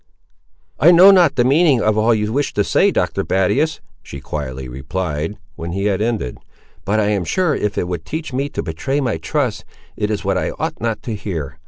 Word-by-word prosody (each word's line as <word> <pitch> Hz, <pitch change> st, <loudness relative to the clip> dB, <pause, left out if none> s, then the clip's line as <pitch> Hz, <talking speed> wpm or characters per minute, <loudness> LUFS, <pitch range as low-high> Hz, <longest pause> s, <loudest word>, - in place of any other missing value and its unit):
"I 155 Hz, -, +6 dB
know 180 Hz, +3 st, +8 dB
not 175 Hz, -6 st, +4 dB
the 120 Hz, -, +3 dB
meaning 140 Hz, +1 st, +4 dB
of 110 Hz, 0 st, +2 dB
all 110 Hz, +2 st, +3 dB
you 105 Hz, 0 st, -2 dB
wish 145 Hz, +2 st, -1 dB
to 105 Hz, -, +2 dB
say, -, -, +3 dB
Dr. -, -, -1 dB
Battius," 130 Hz, -, 0 dB, 0.2 s
she 70 Hz, -, -9 dB
quietly 65 Hz, -2 st, -5 dB
replied, 75 Hz, +7 st, -4 dB, 0.2 s
when 85 Hz, +1 st, -6 dB
he 100 Hz, +2 st, -2 dB
had 100 Hz, -1 st, 0 dB
ended; 110 Hz, -, -2 dB, 0.5 s
"but 105 Hz, +3 st, +1 dB
I 105 Hz, -1 st, +1 dB
am 100 Hz, -3 st, 0 dB
sure 180 Hz, -, +1 dB
if 105 Hz, -6 st, -2 dB
it 90 Hz, -, -1 dB
would 90 Hz, -3 st, -4 dB
teach 155 Hz, -, -5 dB
me 140 Hz, +3 st, -1 dB
to -, -, -4 dB
betray 135 Hz, -, -2 dB
my 125 Hz, -5 st, -1 dB
trust, 130 Hz, -9 st, -2 dB, 0.3 s
it 105 Hz, -, -2 dB
is 105 Hz, -2 st, -3 dB
what 95 Hz, -1 st, +1 dB
I -, -, -2 dB
ought -, -, -4 dB
not 115 Hz, -1 st, -2 dB
to 120 Hz, -, -4 dB
hear. 90 Hz, -9 st, -5 dB
105 Hz, 210 wpm, -19 LUFS, 90-140 Hz, 0.5 s, know